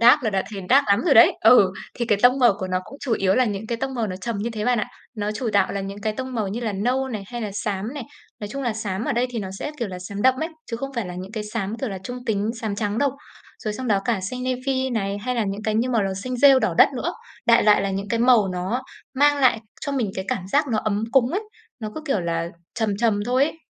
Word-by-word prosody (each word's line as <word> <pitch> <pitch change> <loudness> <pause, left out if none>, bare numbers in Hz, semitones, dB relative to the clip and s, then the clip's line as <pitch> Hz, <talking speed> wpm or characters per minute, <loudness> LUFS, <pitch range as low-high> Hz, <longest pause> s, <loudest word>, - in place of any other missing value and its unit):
Dark 245 +5 +7
là 220 - 0
đã 190 -1 0
thấy 200 -2 -5
dark 280 +2 +6
lắm 200 +2 +4
rồi 300 - +4
đấy. 225 - +8
Ừ, 210 -5 +6 0.2
thì 235 - -2
cái 205 -2 +2
tông 250 +2 +6
màu 240 -5 +6
của 185 - -3
nó 185 0 0
cũng 275 - -12
chủ 255 -5 -2
yếu 195 -2 +2
là 255 - +4
những 210 -1 -3
cái 235 0 -3
tông 265 +1 -3
màu 230 -3 -1
nó 185 -2 -4
trầm 220 +2 -4
như 230 +3 -2
thế 215 -2 -4
bạn 245 -2 +2
ạ. 210 - -2 0.3
Nó 210 -1 -2
chủ 225 +2 -3
đạo 200 -2 +3
là 200 - -2
những 195 +1 -6
cái 215 +1 -1
tông 260 +2 -5
màu 215 -4 -1
như 225 +5 -4
là 220 -3 -2
nâu 250 +7 0
này, 215 -5 -4
hay 240 +1 -6
là 210 - -3
xám 210 +5 -3
này. 285 - -4 0.4
Nói 205 - -5
chung 275 +4 -5
là 240 -3 0
xám 215 -1 -3
ở - - 0
đây 240 +2 +1
thì 235 - -4
nó 190 -2 -4
sẽ, 295 - -4
kiểu, 235 -4 -2
là 180 -1 -6
xám 200 +2 -6
đậm 260 0 +5
ấy, 320 - -1 0.2
chứ 230 - -2
không 275 +3 -5
phải 230 -6 -2
là 180 - -6
những 185 +3 -7
cái 215 -2 -4
xám, 210 0 -3
kiểu 265 - -1
là, 195 -2 -5
trung 245 +2 -6
tính, 210 0 0
xám 215 -3 -2
trắng 210 0 -1
đâu. 285 -1 +2 0.5
Rồi 215 -1 -3
xong 255 +1 -4
đó 200 -2 +3
cả 225 -5 0
xanh 250 +7 -4
navy 260 +1 -1
này, 200 -3 -1
hay 250 +4 -2
là 230 -3 +1
những 200 +2 -4
cái 215 -1 -1
như 240 +3 +1
màu 225 -4 +2
là 195 -1 -1
xanh 250 +6 -4
rêu 275 0 +7
đỏ - - 0
đất - - +8
nữa. - - -2 0.3
Đại 235 0 +6
loại 210 -2 +5
là 195 - -1
những 195 +1 -3
cái 230 - 0
màu 235 -5 +5
nó 185 +8 -2 0.3
mang 290 +2 +4
lại 245 -4 +4 0.2
cho 285 - -3
mình 240 -8 0
cái 190 - -3
cảm 185 -1 -2
giác 285 +5 +2
nó 220 - 0
ấm 215 0 -1
cúng 260 -1 +4
ấy, 395 +5 -1 0.4
nó 215 -1 -4
cứ, - - -5
kiểu 240 -9 +1
là, 170 0 -2 0.3
trầm 215 -3 0
trầm 210 -2 +1
thôi 255 +3 +3
ấy. 320 +1 -5
220 Hz, 300 wpm, -23 LUFS, 200-250 Hz, 0.5 s, đấy